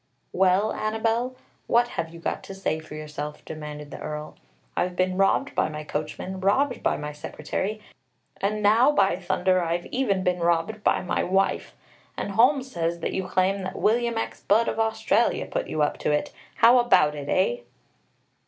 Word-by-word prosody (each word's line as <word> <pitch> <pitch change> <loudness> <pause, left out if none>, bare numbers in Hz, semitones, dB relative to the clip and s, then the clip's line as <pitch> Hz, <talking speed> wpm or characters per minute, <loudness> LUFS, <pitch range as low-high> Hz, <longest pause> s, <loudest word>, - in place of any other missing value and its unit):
"Well, 190 +3 +3
Annabelle, 225 +4 -1 0.3
what 240 +1 +3
have 165 - -3
you 170 +1 -11
got - - -3
to 195 - -8
say 160 -5 -1
for 155 -1 -10
yourself?" 150 -1 -6
demanded 150 -2 -7
the - - -8
Earl. 150 0 -6 0.4
"I've 180 0 -1
been 185 0 +1
robbed 195 +9 +2
by - - +1
my 150 0 -6
coachman, 155 +5 -4
robbed 245 +8 +1
by - - +1
my 150 0 -5
secretary, 170 +8 -4 0.6
and 210 +1 -1
now, 230 +7 +5
by 195 -11 +3
thunder, 185 0 +1
I've 170 +1 -1
even 205 -8 0
been 180 -1 +1
robbed 175 +5 0
by - - +2
my 180 - 0
wife! 195 +2 0 0.4
And - - -3
Holmes 260 +5 +3
says 170 0 -2
that - - -2
you 190 -1 -2
claim 185 +2 +1
that 185 0 -5
William 235 +1 +2
X. 225 - -4
Budd 225 +3 +3
of - - -2
Australia 225 0 +1
put - - -3
you 155 - 0
up 145 - -1
to - - -1
it! 150 - -1 0.2
How 240 +2 +6
about 150 -11 +4
it, 145 -1 -6
eh?" 120 -10 +1
185 Hz, 180 wpm, -25 LUFS, 160-220 Hz, 0.6 s, How